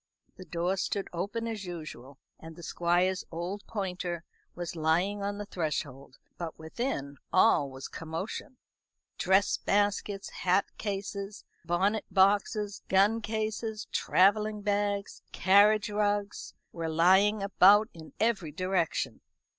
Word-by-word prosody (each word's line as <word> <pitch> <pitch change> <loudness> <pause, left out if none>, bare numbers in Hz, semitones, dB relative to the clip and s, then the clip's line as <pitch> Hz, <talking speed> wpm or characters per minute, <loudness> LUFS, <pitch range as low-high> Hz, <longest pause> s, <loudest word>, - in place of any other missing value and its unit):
The 185 - -11
door 175 +3 -1
stood 195 +1 -2
open 200 +7 -3
as 220 -3 -4
usual, 155 -6 -8 0.2
and 160 0 -10
the 170 - -12
Squire's 175 +3 +1
old 175 +5 -4
pointer 180 -5 -3 0.3
was 175 -1 -5
lying 170 +6 +1
on 200 0 -2
the 205 - -5
threshold; 145 -7 -4 0.2
but 170 -2 -5
within 160 - -4
all 140 - +4
was 130 0 -8
commotion. 165 +10 -6 0.6
Dress 190 +2 +3
baskets, 205 0 0
hat 185 +2 +1
cases, 200 0 -4 0.2
bonnet 195 +6 +1
boxes, 205 +1 +2
gun 205 +4 +4
cases, 220 0 -3
travelling 205 +5 +2
bags, 205 -1 -1
carriage 205 +2 +5
rugs, 205 -1 -1 0.2
were 165 -1 -4
lying 190 +6 +4
about 200 +2 +6
in 160 -2 -12
every 210 -8 +1
direction. 185 +1 -1
195 Hz, 120 wpm, -29 LUFS, 170-205 Hz, 0.6 s, about